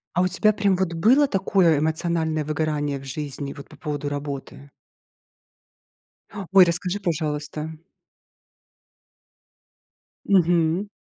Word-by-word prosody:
А 180 - +3
у - - +2
тебя 215 +4 +2
прям 200 -2 +1
вот 185 -2 -1
было 245 - +4
такое 190 - +2
эмоциональное 160 0 -1
выгорание 150 -2 -2
в - - -13
жизни, 140 0 -5
вот, 140 - -12
по - - -15
поводу 145 -2 -4
работы? 140 -1 -7 1.8
Ой, 190 -1 +8
расскажи, 180 +3 -1
пожалуйста. 155 -3 -3 2.5
Мгм. 175 0 +2
160 Hz, 105 wpm, -23 LUFS, 150-185 Hz, 2.5 s, Ой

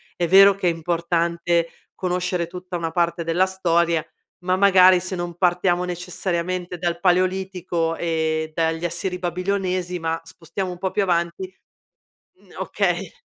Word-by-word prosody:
è 175 - 0
vero 195 +2 +8
che 185 -2 +1
è - - +2
importante 170 0 0 0.3
conoscere 180 -1 -2
tutta 180 +1 -6
una 165 -1 -3
parte 170 0 0
della 170 +3 +2
storia, 170 -4 +1 0.4
ma 185 0 +2
magari 185 -2 +6
se 185 +1 -4
non 175 -1 -4
partiamo 180 0 +1
necessariamente 180 0 -3
dal 170 -1 -1
Paleolitico 180 -2 0
e 160 -1 -1
dagli 165 0 0
Assiri-Babilonesi, 180 +1 -2
ma 165 0 -1
spostiamo 175 +3 -6
un 180 - -8
po' 190 +1 -1
più 205 - +1
avanti 175 - -1 0.9
mhmm, - - -22
okay. - - -1
175 Hz, 135 wpm, -22 LUFS, 170-185 Hz, 0.9 s, vero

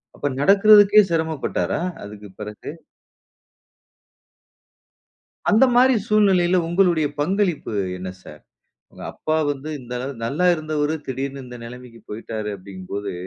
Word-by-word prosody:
அப்ப 145 - -2
நடக்குறதுக்கே 205 +4 +6
சிரமப்பட்டாரா? 160 -1 -1 0.2
அதுக்குப் 105 -2 -11
பிறகு. 105 0 -8 2.8
அந்தமாரி 250 +2 +5
சூழ்நிலையில 190 -4 +3
உங்களுடைய 170 -4 +2
பங்களிப்பு 180 - -1 0.2
என்ன 95 0 -6
சார்? - - -13 0.5
உங்க - - -13
அப்பா 155 0 -2
வந்து 145 +2 -4
இந்த 125 -1 -10
அள 125 - -5 0.2
நல்லா 150 +10 0
இருந்தவரு 155 -1 -2
திடீர்னு 135 +1 -4
இந்த 125 0 -10
நிலைமைக்கு 125 -1 -11
போயிட்டாரு 110 0 -5
அப்பிடிங்கம்போது, 95 +1 -7
145 Hz, 105 wpm, -21 LUFS, 115-185 Hz, 2.8 s, நடக்குறதுக்கே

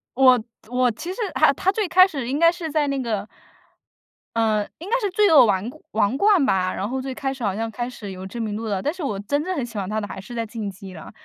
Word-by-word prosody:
我 255 -3 +5 0.3
我 250 -1 +2
其 345 +12 -6
实 - - -13 0.2
他 310 -2 +4
他 380 +7 +1
最 415 -2 -1
开 370 +2 +7
始 275 -10 -4
应 275 +3 -1
该 335 +1 +6
是 340 -2 -5
在 295 -1 +1
那 275 -1 -1
个 215 -4 -2 1.1
嗯， 215 -2 +1
应 360 +5 -8
该 - - +2
是 405 -4 -1
罪 415 0 +4
恶 285 -6 +8
王 200 +2 0 0.2
王 215 +4 +1
冠 400 -5 +4
吧， 185 -7 +1
然 200 - -3
后 265 +1 -2
最 260 0 -4
开 270 0 -3
始 260 -3 -8
好 200 -2 0
像 225 +1 -2
开 240 +2 -4
始 220 -5 -8
有 185 0 -8
知 220 +5 -7
名 215 -2 -2
度 225 - -5
了， 200 -3 -1
但 295 - 0
是 350 -2 -7
我 205 -8 -2
真 285 +9 -1
正 370 +1 -2
很 270 - -1
喜 230 -3 -9
欢 190 -2 -2
他 215 +1 -2
的 205 - -5
还 190 - -7
是 195 +6 -10
在 230 -1 -2
《进 220 -4 -4
击》 190 0 -11
了， 160 - -10
245 Hz, 295 characters per minute, -23 LUFS, 210-305 Hz, 1.1 s, 恶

